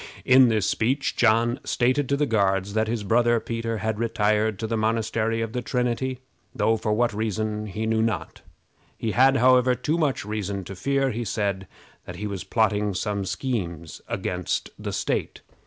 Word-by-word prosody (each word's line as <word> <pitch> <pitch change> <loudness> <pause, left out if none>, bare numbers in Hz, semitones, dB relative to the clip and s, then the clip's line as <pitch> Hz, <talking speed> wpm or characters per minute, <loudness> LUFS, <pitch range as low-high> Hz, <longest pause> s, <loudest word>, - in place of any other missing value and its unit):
In 130 0 +7
this 110 -3 +1
speech 130 +4 0
John 120 +1 +3
stated 130 +2 +1
to 140 - +2
the 150 - +2
Guards 100 -4 +1
that 110 0 +1
his 110 -1 -2
brother 120 +2 +3
Peter 115 0 -3
had 110 0 -2
retired 110 -2 +1
to 110 - -4
the 115 +1 -1
Monastery 115 0 0
of 115 0 -3
the 125 - -2
Trinity, 125 +1 -1 0.3
though 110 - +2
for 110 -1 -2
what 120 +2 +1
reason 110 0 -2
he 105 +2 -4
knew 110 0 +1
not. 115 -1 -2 0.6
He 110 - -2
had, 135 +4 +4
however, 125 0 +4
too 155 +6 -1
much 145 -9 0
reason 100 -2 -3
to 95 +2 -8
fear, 135 +7 0
he 120 +1 -3
said, 100 -3 -2 0.4
that - - -8
he 105 - -5
was 100 -3 -4
plotting 105 -3 +1
some 100 0 -2
schemes 90 - -4
against 90 -1 -2
the - - -4
state. - - -2
110 Hz, 175 wpm, -25 LUFS, 105-120 Hz, 0.6 s, In